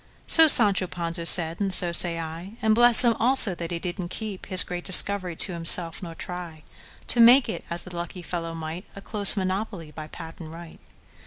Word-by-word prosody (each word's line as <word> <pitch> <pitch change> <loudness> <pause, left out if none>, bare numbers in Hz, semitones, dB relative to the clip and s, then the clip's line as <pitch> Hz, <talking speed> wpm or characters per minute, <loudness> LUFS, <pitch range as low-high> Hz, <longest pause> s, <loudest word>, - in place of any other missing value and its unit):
So 325 -1 +5
Sancho 205 -9 +4
Panza 170 -1 -6
said, 165 -2 +2
and 195 -1 -3
so 175 -1 +4
say 170 -1 +1
I:And 180 +7 -6
bless 240 +1 +3
him, 235 -1 +1
also, 245 -4 +2
that 170 -1 -9
he 175 - -6
did 180 +2 -8
n't 175 - -9
keepHis 190 -3 -3
great 175 0 -9
discovery 190 -2 0
to 185 - 0
himself; 165 0 +4
nor 170 -3 -11
tryTo 175 +5 -10
make 245 +3 +4
it—as 175 -6 -7
the 180 -1 -12
lucky 175 +1 -9
fellow 165 -1 -7
might—A 165 +5 -11
close 205 0 +1
monopoly 190 -3 -6
by 155 0 -12
patent 165 0 -13
right! 165 0 -14
180 Hz, 175 wpm, -22 LUFS, 165-200 Hz, -, So